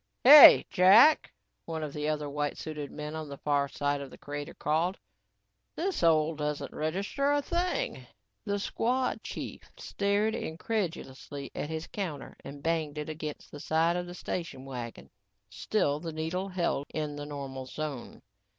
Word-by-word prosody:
"Hey, 290 +3 +11
Jack," 205 +12 +6 0.3
one 160 -1 -4
of 150 -2 -5
the 150 0 -2
other 150 -1 -2
white 145 0 -2
suited 150 -2 -6
men 150 +1 -6
on 155 -2 -6
the 140 - -7
far 145 -1 +1
side 145 0 -2
of 140 - -7
the - - -13
crater 145 +2 -7
called, 165 +6 0 0.8
"this 370 +2 -2
hole 160 -1 +3
doesn't 150 -1 -4
register 195 - -1
a 290 - +3
thing." 360 - -2 0.4
The 205 -2 -1
squad 250 +5 -1
chief - - -6 0.2
stared 205 +2 0
incredulously 160 - -4
at 150 - -4
his 160 0 -4
counter 160 -9 -6
and 140 +1 -9
banged 160 -3 -1
it 150 +1 -4
against 155 -1 -6
the 145 - -9
side 165 +3 +1
of 175 0 -3
the 175 - -8
station 165 -8 -5
wagon. 120 - -7 0.4
Still 145 -9 0
the 165 0 -5
needle 170 +5 -3
held 170 -6 -1
in 150 -2 -3
the 145 0 -6
normal 135 -3 -6
zone. 145 -3 -6
155 Hz, 160 wpm, -29 LUFS, 145-185 Hz, 0.8 s, Hey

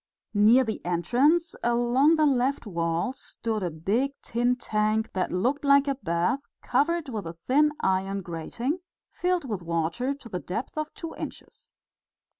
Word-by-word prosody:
Near 220 +5 +6
the 220 -3 -4
entrance, 260 - +2
along 240 +6 +4
the 310 -1 +3
left 270 -1 +1
wall 170 +4 -1
stood 225 -4 -4
a 180 - -1
big 205 - 0
tin 240 +2 +1
tank 215 -2 0
that 185 -1 -1
looked 255 +11 0
like 280 0 +5
a 275 - +2
bath 180 0 0 0.2
covered 330 0 +1
with 215 -7 -4
a 165 0 -8
thin 300 +3 +4
iron 190 +1 0
grating, 230 - -3 0.3
filled 360 -3 0
with 210 -6 -3
water 170 - -1
to 275 -4 -13
the 180 -5 -4
depth 205 +10 -5
of 310 0 -3
two 330 -1 -6
inches. - - -9
240 Hz, 155 wpm, -27 LUFS, 185-280 Hz, 0.3 s, Near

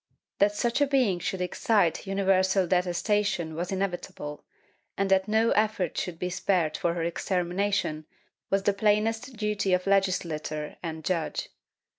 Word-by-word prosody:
That 205 +1 +3
such 240 +5 0
a 285 - +4
being 250 -10 +2
should 185 +1 -3
excite 180 0 +1
universal 190 -1 +2
detestation 180 -1 0
was 175 +4 -3
inevitable, 175 -6 -4 0.5
and 195 0 0
that 190 0 +3
no 220 +2 +3
effort 210 -5 +1
should 175 -3 -3
be 180 +1 -3
spared 175 -4 +1
for 170 0 0
her 170 - -2
extermination 180 -2 -1 0.4
was 195 0 +1
the 205 - +3
plainest 220 +4 +1
duty 210 -3 0
of 180 0 +1
legislator 170 -6 0
and 160 -2 -6
judge. 170 -4 -1
190 Hz, 140 wpm, -27 LUFS, 175-205 Hz, 0.5 s, a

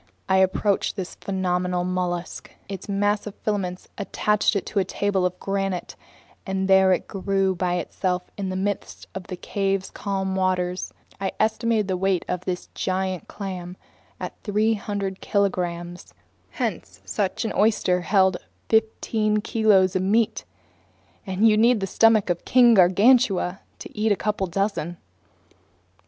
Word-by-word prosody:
I 190 - +3
approached 190 +1 +1
this 190 -3 -5
phenomenal 180 -2 -1
mollusk. 180 -1 -3 0.2
Its 195 0 -7
mass 205 +1 0
of 205 - -7
filaments 185 -4 -3
attached 210 +1 +1
it 200 - -1
to 205 - -1
a - - +3
table 190 0 0
of 180 0 -9
granite, 195 -2 -2 0.5
and 190 -1 -2
there 190 -1 +5
it 185 - 0
grew 195 0 0
by 180 0 -1
itself 180 +1 -2
in 195 -2 -3
the 185 - -3
midst 200 +1 -3
of 190 -2 -7
the 185 - -5
cave's 195 +1 -2
calm 190 -1 -2
waters. 185 -1 -1 0.3
I 195 -1 -2
estimated 220 -1 +1
the 185 -1 -1
weight 190 -1 0
of 180 0 -3
this 180 -1 -3
giant 185 -2 -2
clam 185 -3 -6 0.4
at - - -5
300 205 -2 -1
kilograms. 175 -3 -2 0.3
Hence - - -4
such 200 +1 -2
an - - -2
oyster 200 -4 +2
held 190 -1 +3 0.3
fifteen 220 -1 +1
kilos 205 -4 +3
of 185 - +2
meat, 215 +4 +1 0.8
and 190 +4 +3
you'd 215 -1 +4
need 235 0 +4
the 195 - -1
stomach 215 -1 +4
of 175 - -3
King 245 -2 +6
Gargantua 195 0 +4 0.2
to - - -11
eat 215 0 +1
a - - +4
couple 205 -1 -1
dozen. 180 -2 -2
195 Hz, 145 wpm, -24 LUFS, 185-205 Hz, 0.8 s, King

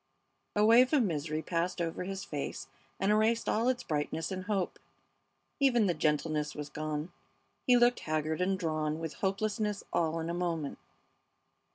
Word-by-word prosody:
A 210 0 +4
wave 245 +5 +6
of 280 -5 +5
misery 155 -4 -2
passed 175 +1 -1
over 170 +1 -2
his 195 +1 -4
face 145 -2 -5 0.3
and 195 +2 +2
erased 220 +2 +2
all 225 +3 +2
its 255 -1 -1
brightness 155 +2 -2
and 185 -1 -4
hope. 200 -3 -1 0.8
Even 245 -6 +4
the 180 - +2
gentleness 150 0 0
was 150 -1 -5
gone. 155 +2 -4 0.6
He 250 -1 +7
looked 240 0 +4
haggard 155 +1 -1
and 190 +1 +1
drawn 155 -3 -1
with 165 -2 -4
hopelessness 210 +1 -1
all 165 -1 +1
in 160 - -3
a 170 - -2
moment. 170 -4 -2
175 Hz, 160 wpm, -31 LUFS, 155-210 Hz, 0.8 s, He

